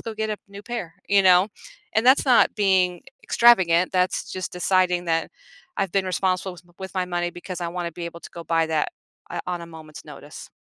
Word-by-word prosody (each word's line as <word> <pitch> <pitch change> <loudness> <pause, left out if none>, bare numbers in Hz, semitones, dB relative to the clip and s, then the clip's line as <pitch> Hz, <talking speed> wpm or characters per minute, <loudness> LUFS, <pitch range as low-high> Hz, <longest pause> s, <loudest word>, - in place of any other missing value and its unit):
go 225 - -6
get 220 0 -2
a 210 - -2
new 200 0 -10
pair," 230 -9 -6
you 200 -1 +4
know? 185 +1 +5 0.5
And 220 - +2
that's 265 +3 +6
not 250 -2 +5
being 190 -3 +2
e - - -24 0.2
extravagant, 185 -7 +4
that's 185 0 0
just 185 -1 -4
deciding 180 -1 +1
that 165 0 0 0.5
I've 195 -3 -1
been 195 -1 +1
responsible 185 0 -1
with 175 0 -15 0.2
with 190 +1 -7
my 185 -1 0
money 175 -1 -2
because 175 +1 -8
I 170 - -2
wanna 175 -1 -4
be 170 +1 -6
able 170 0 -8
to - - -11
go 170 - -9
buy 165 -1 +1
that, 160 -1 0 0.4
uh, - - -4
on 180 -1 -3
a - - -8
moment's 160 -2 -12
notice. - - -11
180 Hz, 215 wpm, -23 LUFS, 170-195 Hz, 0.5 s, that's